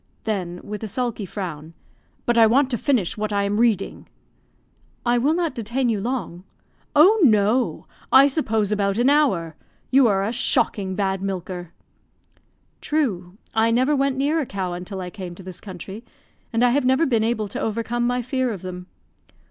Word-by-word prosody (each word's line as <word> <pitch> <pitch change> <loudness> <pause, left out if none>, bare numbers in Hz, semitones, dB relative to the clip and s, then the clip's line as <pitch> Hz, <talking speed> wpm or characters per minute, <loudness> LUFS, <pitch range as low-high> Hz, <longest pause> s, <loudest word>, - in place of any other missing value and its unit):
(then, 180 -5 -3
with 210 0 -6
a - - -3
sulky 230 -2 -3
frown), 165 -4 -6 0.5
"but 240 - +2
I 225 -1 +7
want 265 +4 +3
to 240 - 0
finish 235 - +1
what 215 0 -2
I 200 -1 +1
am 205 +2 0
reading." 225 -5 0 1.0
"I 240 0 +3
will 290 +6 +2
not 340 -2 -1
detain 235 +3 -1
you 215 -3 0
long." 225 -7 -4 0.5
"Oh, 380 +9 +6
no! 220 - +3 0.3
I 270 - +8
suppose 225 -8 0
about 200 -1 0
an 250 +4 +4
hour. 190 - +2 0.4
You 265 -1 +6
are 195 -2 +2
a 210 - -1
shocking 200 -5 0
bad 195 -1 -1
milker." 180 -3 -5 1.1
"True; 200 - -1 0.2
I 225 +1 +3
never 255 +6 +2
went 275 -1 0
near 290 +4 +1
a 300 - -1
cow 185 -2 -3
until 185 +2 -6
I 180 -1 -6
came 180 -3 -7
to 190 - -12
this 185 -1 -9
country; 195 +3 -8 0.5
and 230 +1 +1
I 245 - +5
have 280 +2 +2
never 260 +5 +3
been 230 -6 +1
able 220 -2 0
to - - -5
overcome 230 +2 -1
my 245 0 0
fear 260 0 -1
of 195 -5 -7
them." 180 0 -7
220 Hz, 180 wpm, -22 LUFS, 190-255 Hz, 1.1 s, I